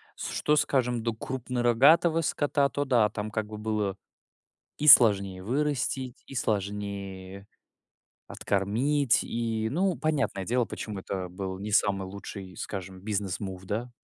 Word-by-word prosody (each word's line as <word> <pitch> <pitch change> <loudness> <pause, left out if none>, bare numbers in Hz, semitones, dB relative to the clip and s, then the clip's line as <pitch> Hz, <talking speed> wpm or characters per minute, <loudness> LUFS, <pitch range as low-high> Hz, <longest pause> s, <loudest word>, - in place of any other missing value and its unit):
С - - -5
что, 150 - +1
скажем, 125 -5 +1
до 115 -1 -1
крупнорогатого 130 +7 +3
скота, 145 -2 +1
то 145 +3 -2
да- 120 -6 +3
там 105 0 -4
как 110 0 -2
бы 105 0 -8
было 105 -3 -1 0.8
и 150 - +1
сложнее 100 -7 +6
вырастить, 130 -1 -1
и 135 - -10
сложнее 100 -3 -4 0.8
откормить, 120 +7 +1
и, 115 -1 -2
ну, 185 +3 +1
понятное 135 -12 -1
дело, 125 +1 +1
почему 105 -3 -6
это 95 -1 -5
был 95 +1 -5
не 105 +1 -5
самый 100 -2 +2
лучший, 95 -2 -8
скажем, 95 0 -6
business 100 -3 -2
move, 95 -2 -5
да. 115 +6 -3
110 Hz, 135 wpm, -28 LUFS, 100-130 Hz, 0.8 s, сложнее